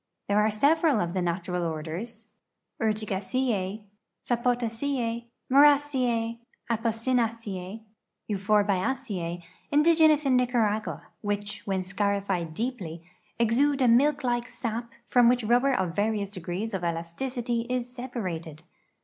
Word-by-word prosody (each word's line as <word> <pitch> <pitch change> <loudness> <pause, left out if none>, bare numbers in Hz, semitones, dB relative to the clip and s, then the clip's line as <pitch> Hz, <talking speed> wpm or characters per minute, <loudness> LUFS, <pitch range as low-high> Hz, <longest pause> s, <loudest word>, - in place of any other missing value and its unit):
There 205 +1 +3
are 210 +1 +4
several 285 +5 +3
of 170 -2 -1
the 185 - 0
natural 175 +1 -2
orders 170 +8 -5 0.3
— - - -21
Crtiaicene,S(ipo((trene, 230 +3 -2 0.3
Mumcene, 260 -5 +4 0.3
Apoq/aaceae, 225 -3 -1
and - - -27 0.5
Euphorblaceac 200 -2 0
— - - -35
indigenous 310 0 +5
in 265 -2 +4
Nica 250 0 +1
ragua, 210 -8 0 0.2
which, 205 0 -3
when 190 -1 0
scarified 195 -4 -1
deepl}^ 195 -9 -4 0.3
exude 265 +5 +2
a - - +5
milk 275 +5 +4
like 240 -1 0
sap 235 -1 -5
from 245 -2 +5
which 245 -2 +2
rubl)er 245 +4 +3
of 180 -3 -1
various 205 -1 0
degrees 185 +3 -4
of 190 -2 -2
elasticity 230 +9 -2
is 250 -1 -1
se]>arated. 180 - -5
225 Hz, 115 wpm, -27 LUFS, 190-250 Hz, 0.5 s, indigenous